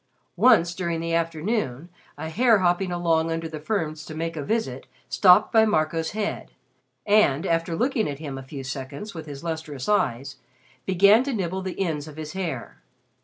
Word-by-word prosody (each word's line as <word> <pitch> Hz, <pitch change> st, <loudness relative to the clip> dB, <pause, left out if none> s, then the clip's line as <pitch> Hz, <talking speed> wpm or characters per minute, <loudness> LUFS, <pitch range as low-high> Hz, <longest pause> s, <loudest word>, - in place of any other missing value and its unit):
Once, 175 Hz, -9 st, +5 dB
during 170 Hz, -2 st, -2 dB
the 165 Hz, 0 st, -3 dB
afternoon, 165 Hz, -, -1 dB, 0.3 s
a 160 Hz, -, -5 dB
hare 225 Hz, +7 st, +4 dB
hopping 180 Hz, 0 st, +1 dB
along 165 Hz, -2 st, +1 dB
under 165 Hz, 0 st, -2 dB
the 155 Hz, -1 st, -7 dB
ferns 155 Hz, -3 st, -2 dB
to 155 Hz, -, -9 dB
make 165 Hz, +1 st, -3 dB
a 155 Hz, -, -3 dB
visit 140 Hz, -, -2 dB, 0.2 s
stopped 185 Hz, +3 st, +5 dB
by 220 Hz, -1 st, +6 dB
Marco's 160 Hz, -5 st, +1 dB
head, 210 Hz, -1 st, -4 dB, 0.5 s
and, 200 Hz, -7 st, +3 dB
after 165 Hz, -1 st, 0 dB
looking 240 Hz, -, 0 dB
at 140 Hz, -, -5 dB
him 145 Hz, -2 st, -6 dB
a 135 Hz, -, -6 dB
few 135 Hz, +1 st, -8 dB
seconds 135 Hz, +9 st, -6 dB
with 160 Hz, -2 st, -8 dB
his 140 Hz, 0 st, -8 dB
lustrous 160 Hz, -5 st, -5 dB
eyes, 140 Hz, -, 0 dB, 0.5 s
began 200 Hz, +5 st, +5 dB
to 275 Hz, 0 st, -3 dB
nibble 190 Hz, -3 st, -2 dB
the 185 Hz, -1 st, -6 dB
ends 160 Hz, -6 st, -2 dB
of 155 Hz, -1 st, -11 dB
his 155 Hz, -1 st, -6 dB
hair. 175 Hz, -, -5 dB
165 Hz, 175 wpm, -24 LUFS, 155-195 Hz, 0.5 s, by